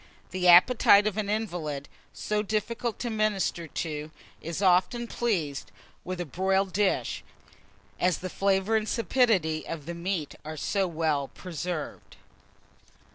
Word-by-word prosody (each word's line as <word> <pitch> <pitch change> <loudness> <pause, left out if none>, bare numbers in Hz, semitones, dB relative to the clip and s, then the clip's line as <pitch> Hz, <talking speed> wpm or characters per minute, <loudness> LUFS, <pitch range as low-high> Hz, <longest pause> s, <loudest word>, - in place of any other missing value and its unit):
The 180 -1 0
appetite 200 +3 +7
of 215 -2 0
an 210 -2 -1
invalid, 170 -10 -3 0.2
so 210 0 -2
difficult 220 +2 -2
to 240 - -2
minister 210 -6 0
to, 155 -1 -4 0.3
is 165 +1 -4
often 190 +5 +3
pleased 180 -13 -2 0.3
with 185 0 -5
a 175 - -2
broiled 190 +5 0
dish, 200 0 0 0.8
as 180 -1 +2
the 185 - -5
flavour 195 +3 +1
and 215 0 0
sapidity 200 -8 +2
of 160 -4 -6
the 170 - -5
meat 170 -3 -3
are 155 +1 -7
so 195 +4 0
well 155 -4 0
preserved. 175 -1 -6
185 Hz, 130 wpm, -27 LUFS, 165-210 Hz, 0.8 s, appetite